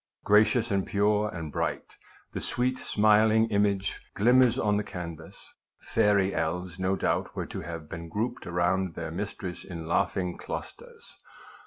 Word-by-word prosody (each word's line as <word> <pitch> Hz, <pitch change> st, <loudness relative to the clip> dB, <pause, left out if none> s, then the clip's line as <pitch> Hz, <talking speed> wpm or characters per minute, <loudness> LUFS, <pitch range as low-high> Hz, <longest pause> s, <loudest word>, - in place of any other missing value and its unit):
Gracious, 110 Hz, +3 st, +4 dB
and 95 Hz, -1 st, 0 dB
pure, 105 Hz, 0 st, +2 dB
and 80 Hz, -5 st, -6 dB
bright, -, -, -3 dB, 0.4 s
the -, -, -3 dB
sweet 125 Hz, +1 st, -1 dB
smiling 110 Hz, +1 st, +4 dB
image 100 Hz, -1 st, +1 dB
glimmers 125 Hz, +3 st, +5 dB
on 105 Hz, -5 st, +2 dB
the 105 Hz, -, 0 dB
can 90 Hz, -4 st, -6 dB
vas. -, -, -14 dB, 0.3 s
Fairy 100 Hz, -3 st, +2 dB
elves 85 Hz, +2 st, -2 dB
no 95 Hz, +1 st, +1 dB
doubt -, -, -1 dB
were -, -, -3 dB
to -, -, -6 dB
have 80 Hz, -1 st, -7 dB
been 85 Hz, +1 st, -7 dB
grouped 110 Hz, +8 st, -3 dB
around 90 Hz, +1 st, 0 dB
their 80 Hz, -1 st, -5 dB
mistress 90 Hz, -1 st, -5 dB
in 85 Hz, -3 st, -7 dB
laughing 90 Hz, +2 st, 0 dB
clusters. -, -, -8 dB
100 Hz, 150 wpm, -28 LUFS, 85-105 Hz, 0.4 s, glimmers